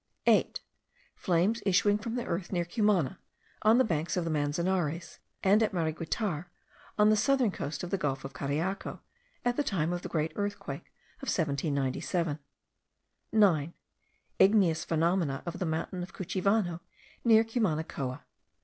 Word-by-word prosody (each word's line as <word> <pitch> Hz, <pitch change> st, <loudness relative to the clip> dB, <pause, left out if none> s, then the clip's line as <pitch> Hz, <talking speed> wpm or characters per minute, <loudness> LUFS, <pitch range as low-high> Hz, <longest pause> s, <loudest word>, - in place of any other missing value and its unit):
8. -, -, +3 dB, 0.6 s
Flames 190 Hz, +6 st, +1 dB
issuing 200 Hz, +2 st, +3 dB
from 230 Hz, +2 st, -4 dB
the 245 Hz, -, -2 dB
earth, 170 Hz, +1 st, -3 dB
near 175 Hz, -2 st, 0 dB
Cumana, 200 Hz, -, +1 dB, 0.4 s
on 220 Hz, +2 st, +5 dB
the 260 Hz, -, +5 dB
banks 165 Hz, -4 st, -1 dB
of 180 Hz, -, +1 dB
the 165 Hz, -, -1 dB
Manzanares, 165 Hz, +2 st, -1 dB, 0.2 s
and 200 Hz, +3 st, +5 dB
at 220 Hz, -, +1 dB
Mariguitar, 165 Hz, +1 st, -2 dB, 0.5 s
on 210 Hz, 0 st, +5 dB
the -, -, +5 dB
southern 250 Hz, 0 st, +3 dB
coast 150 Hz, -2 st, -5 dB
of 175 Hz, -, -5 dB
the 195 Hz, -, 0 dB
gulf 135 Hz, -2 st, -2 dB
of 135 Hz, -, -7 dB
Cariaco, 160 Hz, +8 st, -3 dB, 0.4 s
at 245 Hz, 0 st, +1 dB
the 295 Hz, -, +2 dB
time 175 Hz, -, 0 dB
of 175 Hz, -, -3 dB
the -, -, -6 dB
great 155 Hz, 0 st, -1 dB
earthquake 205 Hz, 0 st, -4 dB, 0.3 s
of 275 Hz, -, -7 dB
1797. 145 Hz, +1 st, -1 dB, 0.9 s
9. 175 Hz, -8 st, +3 dB, 0.7 s
Igneous 190 Hz, -5 st, +4 dB
phenomena 165 Hz, -3 st, 0 dB
of 175 Hz, +1 st, -5 dB
the 180 Hz, -, -1 dB
mountain 165 Hz, +3 st, -2 dB
of 180 Hz, +2 st, -7 dB
Cuchivano, 185 Hz, -1 st, 0 dB, 0.4 s
near 225 Hz, -2 st, +6 dB
Cumanacoa. 160 Hz, -, -2 dB
175 Hz, 145 wpm, -30 LUFS, 160-205 Hz, 0.9 s, near